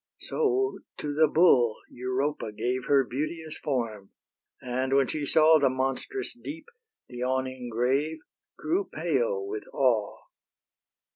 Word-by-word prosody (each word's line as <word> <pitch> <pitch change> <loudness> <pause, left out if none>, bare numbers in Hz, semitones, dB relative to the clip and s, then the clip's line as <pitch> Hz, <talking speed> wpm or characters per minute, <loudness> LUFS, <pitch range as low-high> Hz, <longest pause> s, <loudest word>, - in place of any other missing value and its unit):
So 400 -3 0 0.2
to 145 -1 -3
the 155 +2 +5
bull 130 -9 +4 0.2
Europa 130 0 -2
gave 125 +4 -2
Her 140 -2 +4
beauteous 155 +5 -4
form, 115 -8 -3 0.5
and 130 +2 -2
when 135 0 +5
she 145 +2 -3
saw 160 +1 +6
The 140 - +4
monstrous 135 - -2
deep, 295 +6 -8 0.4
the 125 - -10
yawning 130 0 -2
grave, 135 +7 0 0.4
Grew 370 +5 -1
pale 480 -4 0
with 415 +1 -5
awe. - - +1
140 Hz, 125 wpm, -27 LUFS, 125-160 Hz, 0.5 s, saw